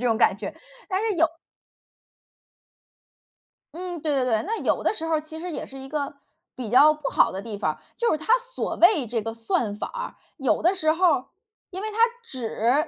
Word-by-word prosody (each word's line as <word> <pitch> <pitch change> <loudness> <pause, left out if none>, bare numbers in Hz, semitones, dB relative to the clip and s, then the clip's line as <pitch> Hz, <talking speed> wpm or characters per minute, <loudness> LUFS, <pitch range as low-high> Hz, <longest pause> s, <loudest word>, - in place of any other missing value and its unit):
这 250 - 0
种 225 -2 +3
感 205 - +4
觉， 205 - -5 0.3
但 375 0 0
是 440 -3 +1
有 330 0 +5 2.5
嗯， 350 -1 -5
对 300 -2 0
对 265 -2 +2
对。 225 -4 +1
那 445 +5 -2
有 - - +1
的 - - +2
时 325 - -6
候 325 - 0
儿 305 - 0
其 315 +1 -10
实 355 0 -5
也 - - -4
是 270 0 -10
一 270 0 -9
个 285 -2 -3 0.4
比 245 -5 -5
较 295 +6 +7
不 305 -1 -4
好 - - +4
的 190 +1 -5
地 210 -2 -6
方。 - - -1 0.2
就 470 - +2
是 310 - +2
它 445 - +2
所 - - -4
谓 340 - +5
这 230 -1 -1
个 225 0 -3
算 225 -2 -1
法 - - -4
儿， - - -6 0.2
有 270 -3 +1
的 355 +4 +4
时 315 -4 +2
候 355 +3 +2
儿 255 - -1 0.5
因 375 +2 -5
为 435 - -3
它 430 - -8 0.3
只 255 - 0
305 Hz, 230 characters per minute, -25 LUFS, 240-360 Hz, 2.5 s, 较